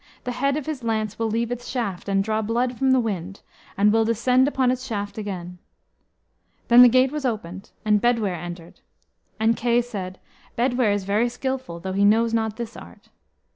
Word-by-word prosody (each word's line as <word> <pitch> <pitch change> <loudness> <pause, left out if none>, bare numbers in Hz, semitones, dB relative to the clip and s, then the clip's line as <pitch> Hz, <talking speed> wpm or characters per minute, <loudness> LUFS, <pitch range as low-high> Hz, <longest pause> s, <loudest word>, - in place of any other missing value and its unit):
The 250 - -3
head 275 +3 0
of 300 - -4
his 300 -6 -5
lance 220 -2 -2
will 225 -1 0
leave 230 +2 -1
its 245 0 -5
shaft, 205 -7 -3
and 195 0 +2
draw 215 +1 -1
blood 240 +3 -1
from 265 +3 +1
the 260 0 +5
wind, 195 -4 -4 0.4
and 205 +1 +4
will 225 0 +4
descend 250 +4 +2
upon 260 -3 +1
its 255 0 -3
shaft 205 -5 -4
again." 180 -4 -6 1.1
Then 240 +1 +8
the 250 - +9
gate 255 +2 +3
was 300 -1 -4
opened, 200 -6 -4 0.2
and 210 -1 +3
Bedwyr 230 -5 +1
entered. 175 0 -9 0.6
And 225 +1 +3
Kay 240 +1 +2
said, 195 -6 -5 0.4
"Bedwyr 245 -2 +2
is 205 -1 -1
very 210 +5 +1
skilful, 260 -6 -4
though 190 +2 -5
he 200 +1 +1
knows 225 +3 +3
not 220 -2 -1
this 235 0 -6
art." - - -13
225 Hz, 190 wpm, -23 LUFS, 200-245 Hz, 1.1 s, the